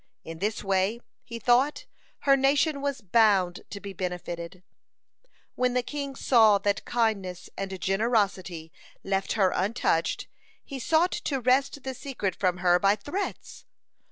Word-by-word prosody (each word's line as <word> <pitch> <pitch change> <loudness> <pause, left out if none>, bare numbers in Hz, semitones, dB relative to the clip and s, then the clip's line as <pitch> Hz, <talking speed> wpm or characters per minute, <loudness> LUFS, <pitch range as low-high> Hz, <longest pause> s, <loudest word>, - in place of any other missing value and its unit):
In 165 0 -8
this 210 +3 -2
way, 195 +3 +1 0.2
he 235 - -7
thought, 245 +6 +2 0.4
her 275 -1 +5
nation 280 +2 +2
was 280 -2 -2
bound 195 -3 +3
to 200 - -7
be 200 -1 -8
benefited. 180 -1 -5 0.6
(84) - - -39 0.2
When 250 -1 0
the 250 - +2
king 280 0 -5
saw 220 -6 +5
that 200 +1 -1
kindness 200 -7 -1
and 195 -1 -5
generosity 195 -5 0 0.3
left 195 0 -1
her 195 -4 +3
untouched, 185 -4 0 0.4
he 275 -2 -7
sought 325 +7 +2
to 275 -3 -2
wrest 265 +3 +1
the 265 - -4
secret 250 -8 -4
from 180 -2 0
her 175 0 +5
by 200 +2 +4
threats. 350 - -6
215 Hz, 145 wpm, -27 LUFS, 190-265 Hz, 0.6 s, her